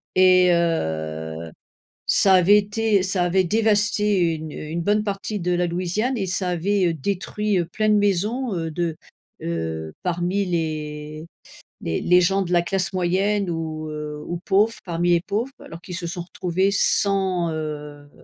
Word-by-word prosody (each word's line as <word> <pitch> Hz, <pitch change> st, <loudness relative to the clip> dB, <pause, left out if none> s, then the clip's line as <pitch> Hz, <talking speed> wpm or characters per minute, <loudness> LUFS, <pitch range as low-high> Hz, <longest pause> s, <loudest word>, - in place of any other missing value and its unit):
et 185 Hz, -1 st, +6 dB
heu, 80 Hz, -, -2 dB, 0.6 s
ça 195 Hz, -1 st, +5 dB
avait 185 Hz, +3 st, +6 dB
été 210 Hz, 0 st, +1 dB
ça 185 Hz, -1 st, +1 dB
avait 185 Hz, +2 st, +2 dB
dévasté 210 Hz, -3 st, +2 dB
une 155 Hz, -1 st, -7 dB
une 160 Hz, +3 st, -4 dB
bonne 210 Hz, +4 st, +2 dB
partie 200 Hz, 0 st, -3 dB
de 180 Hz, +1 st, 0 dB
la 175 Hz, 0 st, +1 dB
Louisiane 185 Hz, +9 st, -1 dB
et 195 Hz, -4 st, -2 dB
ça 185 Hz, 0 st, -1 dB
avait, 185 Hz, +2 st, +1 dB
heu, 165 Hz, -, -1 dB
détruit, 200 Hz, +5 st, -1 dB
heu, 175 Hz, -, +1 dB
plein 215 Hz, +5 st, -1 dB
de 210 Hz, -, +5 dB
maisons, 210 Hz, +5 st, 0 dB
heu, 165 Hz, -1 st, -3 dB
de, 165 Hz, 0 st, -2 dB, 0.5 s
heu, 80 Hz, -1 st, -3 dB
parmi 180 Hz, +3 st, 0 dB
les 155 Hz, -2 st, -4 dB, 0.6 s
les 80 Hz, -, -2 dB
les 180 Hz, +1 st, +4 dB
gens 195 Hz, +3 st, +2 dB
de 180 Hz, -, -5 dB
la 175 Hz, -1 st, +4 dB
classe 190 Hz, +1 st, -1 dB
moyenne 190 Hz, +2 st, +1 dB
ou, 160 Hz, -1 st, -4 dB
heu, 150 Hz, 0 st, -6 dB
ou 175 Hz, -, -3 dB
pauvres, 210 Hz, +3 st, +3 dB
parmi 175 Hz, 0 st, 0 dB
les 170 Hz, -1 st, +4 dB
pauvres 225 Hz, +8 st, -2 dB
quoi. -, -, -13 dB
Alors 165 Hz, -, -10 dB
qu'ils 180 Hz, -1 st, -7 dB
se 175 Hz, -, -5 dB
sont 175 Hz, +1 st, -4 dB
retrouvés 185 Hz, +2 st, -1 dB
sans, 190 Hz, -4 st, +2 dB
heu, 150 Hz, -2 st, -6 dB
180 Hz, 170 wpm, -23 LUFS, 160-200 Hz, 0.6 s, et